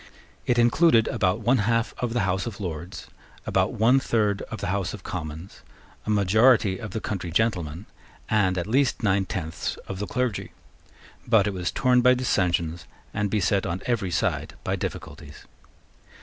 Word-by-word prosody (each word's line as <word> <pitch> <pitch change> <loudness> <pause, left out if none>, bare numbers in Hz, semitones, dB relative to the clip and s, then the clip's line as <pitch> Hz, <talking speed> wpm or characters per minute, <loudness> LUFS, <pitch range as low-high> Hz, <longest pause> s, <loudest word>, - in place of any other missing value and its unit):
It 120 - +2
included 120 0 +4
about 95 +3 0
one 120 +3 +3
half 115 +2 +1
of 120 -2 -2
the 120 - +1
House 95 +3 -1
of 110 -3 -7
Lords, 85 -2 -6 0.4
about - - +1
one 120 +5 +4
third 105 -6 0
of 110 - -6
the 100 - -3
House 100 0 -2
of 100 - -13
Commons, 80 +1 -7 0.5
a - - -2
majority 105 0 +4
of 105 - -6
the 110 - -4
country 95 -5 -4
gentlemen, 90 -3 -1 0.4
and 95 -4 +2
at 85 - -1
least 125 +3 +1
nine 100 -2 +2
tenths 80 -4 -4
of 95 - -5
the 105 - -3
clergy; 125 -4 -2 0.7
but 110 -4 +4
it 105 - -1
was 90 -2 -2
torn 125 -1 +3
by 125 +1 +5
dissensions, 90 -9 0 0.3
and 105 0 -1
beset 100 -1 +1
on 90 +3 -4
every 115 -6 0
side 85 - -1
by - - -1
difficulties. 75 0 -7
100 Hz, 165 wpm, -25 LUFS, 90-115 Hz, 0.7 s, by